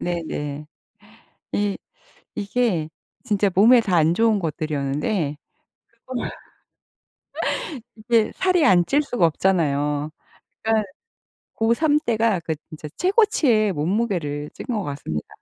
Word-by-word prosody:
네네. 150 -4 -4 0.9
이 205 -1 0 0.6
이게 200 -7 0 0.4
진짜 205 -3 +1
몸에 235 +6 +7
다 190 -6 0
안 160 +1 +3
좋은 225 0 +3
것들이었는데 150 0 -2 0.7
그걸 255 -1 -3 1.7
이게 225 0 +1
살이 365 -4 +2
안 175 -2 +5
찔 285 +8 +2
수가 245 - +1
없잖아요. 150 -4 +1 0.5
그러니까 220 -2 +1 0.7
고3 290 +7 +2
때가 225 -4 +2
그 160 -1 -3
진짜 155 -1 -8
최고치의 310 - +3
몸무게를 160 -4 -1
찐 - - -9
것 220 -5 -1
같습니다. 140 - -5
195 Hz, 220 characters per minute, -22 LUFS, 155-230 Hz, 1.7 s, 몸에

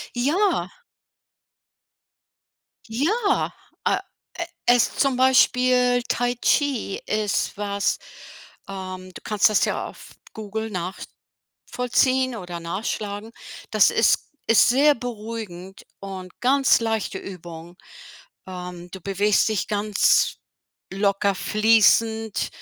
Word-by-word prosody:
Ja. 315 +12 +1 2.2
Ja, 400 - 0 0.3
äh, - - +3 0.4
äh, 340 - -4 0.2
es 245 -1 +3
zum 275 -2 +2
Beispiel 250 -1 +4
Tai 245 0 0
Chi 255 -4 0
ist 215 -1 -1
was, 200 -1 -1 0.7
ähm, 185 -1 -7
du - - -10
kannst 210 0 +3
das 210 - +2
ja - - -2
auf - - -13 0.2
Google 220 +1 -5 0.8
nachvollziehen 255 0 0
oder 175 -4 -7
nachschlagen. 205 +4 -4 0.4
Das - - +5
ist - - +3 0.3
ist 225 +1 +5
sehr 285 +4 +5
beruhigend 215 -6 -7 0.2
und 190 -2 -8
ganz 270 +2 +4
leichte 220 -4 -2
Übung. 175 -2 -10 0.7
Ähm, 180 -1 -8
du 190 - -9
bewegst 200 +3 +2
dich 215 - -1
ganz 210 0 +2 0.5
locker 200 0 +1
fließend, 220 +1 +2
215 Hz, 100 wpm, -23 LUFS, 195-245 Hz, 2.2 s, Das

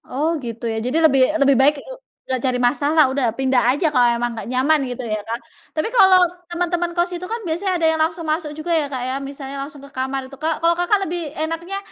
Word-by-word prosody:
Oh 290 +5 -2 0.2
gitu, 235 0 -6
ya. 225 - -3
Jadi, 255 +5 -1
lebih 270 -4 +5 0.2
lebih 275 -2 +5
baik 290 +2 +5
eng - - -10 0.2
enggak 260 -2 -2
cari 250 - 0
masalah, 290 +5 +3
udah 265 -3 0
pindah 265 -1 +2
aja 320 - 0
kalau 245 -1 +5
emang 240 +1 -1
enggak - - -6
nyaman 275 +5 +2
gitu, 245 +1 -5
ya, 215 -1 -2
kan. 230 - -2 0.4
Tapi 310 - 0
kalau 380 -6 +7 0.3
teman-teman 350 0 -1
kos 350 +1 +1
itu, 355 +1 -5
kan, 460 +1 -3
biasanya 345 +4 -1
ada 325 - +2
yang 320 - -2
langsung 330 +1 -1
masuk 310 0 -1
juga, 335 +3 -5
ya, 315 -3 +2
Kak, 265 -3 -5
ya, - - -2
misalnya 275 0 -7
langsung 285 0 -9
ke 280 - -13
kamar 265 0 -4
itu, 275 - -11
Kak. 315 +2 -2
Kalau 335 0 +4
Kakak 375 +4 +2
lebih 335 -3 -4
enaknya 330 +5 -4
300 Hz, 230 wpm, -20 LUFS, 265-335 Hz, 0.4 s, kalau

